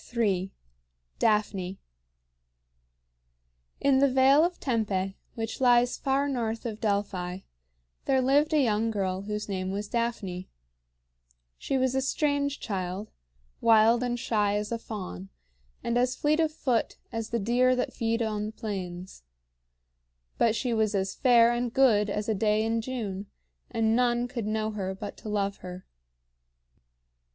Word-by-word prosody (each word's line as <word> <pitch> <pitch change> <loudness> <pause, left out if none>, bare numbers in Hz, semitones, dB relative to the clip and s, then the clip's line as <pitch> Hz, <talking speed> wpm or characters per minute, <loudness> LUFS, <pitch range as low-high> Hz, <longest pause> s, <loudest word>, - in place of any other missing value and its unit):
III. 195 -5 +1 0.7
DAPHNE. 200 -4 +1 2.0
In 275 -1 +3
the 280 0 +5
Vale 265 +3 +5
of 350 +1 -1
Tempe, 200 -6 -1 0.2
which 225 +2 -4
lies 245 -1 +4
far 275 +1 0
north 230 -4 -2
of 220 -2 -5
Delphi, 195 -3 -1 0.6
there 265 -1 +3
lived 285 +4 +3
a 310 - +3
young 225 -1 +1
girl 190 -3 -1
whose 210 +1 -4
name 185 -2 -3
was 200 +2 -3
Daphne. 225 -6 -3 1.1
She 275 - -1
was 260 -1 +1
a 265 - +1
strange 285 +1 0
child, 190 0 -4 0.5
wild 225 +1 +5
and 245 -1 -1
shy 210 -3 +1
as 210 +1 -2
a 230 - -1
fawn, 140 - -7 0.5
and 235 +1 +1
as 250 +1 +1
fleet 300 +2 +1
of 320 -1 +2
foot 255 -6 -1
as 225 -1 -4
the 235 - 0
deer 245 +4 +3
that 250 - -2
feed 230 -1 0
on 210 -1 -2
the - - -5
plains. 185 - -6 1.2
But 225 -1 +3
she 240 +2 -1
was 215 -2 +1
as 190 0 -1
fair 240 -2 +5
and 240 0 -1
good 225 -6 +4
as 210 +1 -2
a 220 - +2
day 215 +1 +1
in 225 0 0
June, 210 -5 -4 0.4
and 225 0 +1
none 240 0 +2
could 240 -4 -4
know 215 0 -1
her 190 -2 -3
but 205 +1 -7
to 215 - -8
love 200 -1 -1
her. 180 0 -9
225 Hz, 145 wpm, -28 LUFS, 200-245 Hz, 2.0 s, the